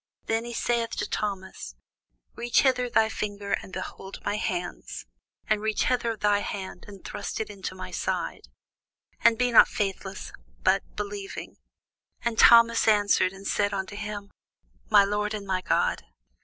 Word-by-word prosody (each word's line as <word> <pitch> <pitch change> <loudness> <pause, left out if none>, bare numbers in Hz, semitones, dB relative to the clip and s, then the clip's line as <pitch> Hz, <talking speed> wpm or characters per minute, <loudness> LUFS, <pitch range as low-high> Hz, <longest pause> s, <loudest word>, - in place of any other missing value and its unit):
Then 230 +2 -1
saith 235 0 0
he - - -5
to - - -1
Thomas, 190 - -4 0.6
Reach 235 -1 +2
hither 250 -2 +2
thy 225 -2 +4
finger, 205 -2 -4
and - - -12
behold 190 +1 -7
my 205 - 0
hands; 180 -4 -4 0.4
and 215 -1 +1
reach 215 0 0
hither 235 -3 0
thy 205 -1 +2
hand, 190 -3 -6
and 200 -2 -12
thrust - - -5
it 220 -1 -3
into 190 -2 -6
my 185 - -7
side: - - -3 0.8
and 230 -1 +6
be 250 +1 +2
not 230 - +8
faithless, 195 -1 -4 0.3
but - - +4
believing. 205 -1 -6 0.7
And 230 -1 -1
Thomas 230 -1 +7
answered 205 -3 +4
and 195 +1 -12
said 205 0 +1
unto 190 +1 -4
him, 205 -1 -6 0.6
My 205 -2 +7
Lord 210 +1 -1
and 205 -1 -6
my 190 -1 -1
God. - - +1
205 Hz, 155 wpm, -27 LUFS, 195-225 Hz, 0.8 s, not